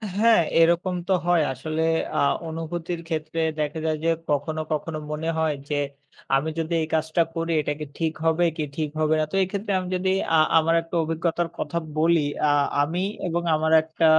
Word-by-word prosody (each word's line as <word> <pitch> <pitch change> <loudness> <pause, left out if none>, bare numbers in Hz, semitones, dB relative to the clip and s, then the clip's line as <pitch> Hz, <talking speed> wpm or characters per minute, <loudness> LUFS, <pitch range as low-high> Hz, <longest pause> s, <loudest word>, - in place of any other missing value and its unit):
হ্যাঁ, 225 -2 +5 0.2
এরকম 170 +2 +3
তো 190 - +3
হয়। 175 -2 +4
আসলে 155 +5 -3 0.4
আ - - +3 0.3
অনুভূতির 165 +1 -4
ক্ষেত্রে 160 0 -3 0.2
দেখা 150 +1 -1
যায় 155 -1 0
যে, - - +3 0.2
কখনো, 155 +2 0
কখনো 155 +1 -2
মনে 160 +2 -2
হয় 160 -2 +1
যে, 145 - 0 0.6
আমি 150 +4 +1
যদি 165 +1 -2
এই 155 - -2
কাজটা 160 +1 +1
করি 165 0 -2
এটা 150 - -2
কি 150 - -4
ঠিক 160 -1 0
হবে, 165 +2 +3
কি 155 - -1
ঠিক 155 -2 -1
হবে 155 0 +2
না? 155 - +2
তো - - -3
এক্ষেত্রে 200 +2 -3
আমি 185 - -5
যদি 185 +1 0 0.3
আ - - +6 0.2
আমার 165 +1 +3
একটা 165 +1 -8
অভিজ্ঞতার 165 +1 -1
কথা 170 - -3 0.2
বলি। 165 +1 +4 0.3
আ - - +4 0.3
আমি 170 +6 0 0.2
এবং 175 +1 -1
আমার 160 +1 0
একটা 160 +1 -1
160 Hz, 185 wpm, -24 LUFS, 155-170 Hz, 0.6 s, আ